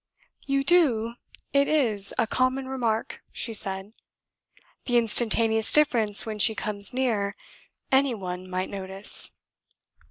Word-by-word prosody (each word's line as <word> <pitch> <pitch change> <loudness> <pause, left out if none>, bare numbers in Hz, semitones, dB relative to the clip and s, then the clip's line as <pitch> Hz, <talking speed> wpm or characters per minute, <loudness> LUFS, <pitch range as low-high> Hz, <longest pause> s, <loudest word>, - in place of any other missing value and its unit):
"You 275 0 0
do; 260 -9 +2 0.4
it 280 0 +3
is 225 -10 +3
a - - +2
common 255 +3 -1
remark," 235 -4 -3
she 230 - -3
said. 195 0 -1 0.9
"The 245 -1 +1
instantaneous 225 -1 +2
difference 230 -9 +3
when 215 -1 -6
she 220 +2 +4
comes 205 -1 -3
near, 220 -6 -1 0.6
any 265 -2 +2
one 185 -2 -7
might 185 +1 -4
notice." 195 0 +1
225 Hz, 120 wpm, -25 LUFS, 200-260 Hz, 0.9 s, she